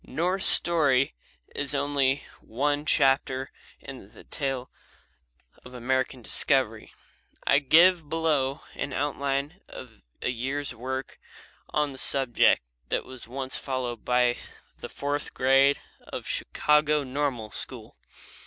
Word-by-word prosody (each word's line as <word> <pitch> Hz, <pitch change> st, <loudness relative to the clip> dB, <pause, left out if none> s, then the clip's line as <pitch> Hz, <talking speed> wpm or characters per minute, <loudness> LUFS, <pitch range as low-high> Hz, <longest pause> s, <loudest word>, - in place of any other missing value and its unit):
Norse 180 Hz, +7 st, -1 dB
story 145 Hz, -6 st, +6 dB, 0.4 s
is 145 Hz, 0 st, -1 dB
only 140 Hz, -1 st, +1 dB, 0.2 s
one 145 Hz, +5 st, -2 dB
chapter 135 Hz, -1 st, +2 dB, 0.3 s
in -, -, -11 dB
that -, -, -17 dB
tale 135 Hz, -2 st, -3 dB, 0.9 s
of 125 Hz, 0 st, -12 dB
American 130 Hz, 0 st, -2 dB
discovery. 120 Hz, -4 st, 0 dB, 0.5 s
I 140 Hz, -, +4 dB
give 165 Hz, +2 st, +4 dB
below 150 Hz, -4 st, 0 dB
an 140 Hz, -, -5 dB
outline 140 Hz, +4 st, -2 dB
of 115 Hz, -4 st, -12 dB, 0.2 s
a -, -, 0 dB
year's 135 Hz, +4 st, -3 dB
work 130 Hz, +3 st, -6 dB, 0.5 s
on 150 Hz, -1 st, 0 dB
the 130 Hz, -, -9 dB
subject 130 Hz, -, +3 dB, 0.3 s
that -, -, -1 dB
was 130 Hz, -3 st, -11 dB
once 130 Hz, +2 st, -3 dB
followed 125 Hz, -4 st, -4 dB
by 125 Hz, -1 st, +2 dB, 0.4 s
the -, -, -8 dB
fourth 145 Hz, +1 st, -4 dB
grade 135 Hz, +2 st, +4 dB, 0.3 s
of -, -, -6 dB
the -, -, -9 dB
Chicago 150 Hz, 0 st, +1 dB
Normal 130 Hz, -5 st, -3 dB
School. -, -, -4 dB
135 Hz, 120 wpm, -26 LUFS, 130-145 Hz, 0.9 s, story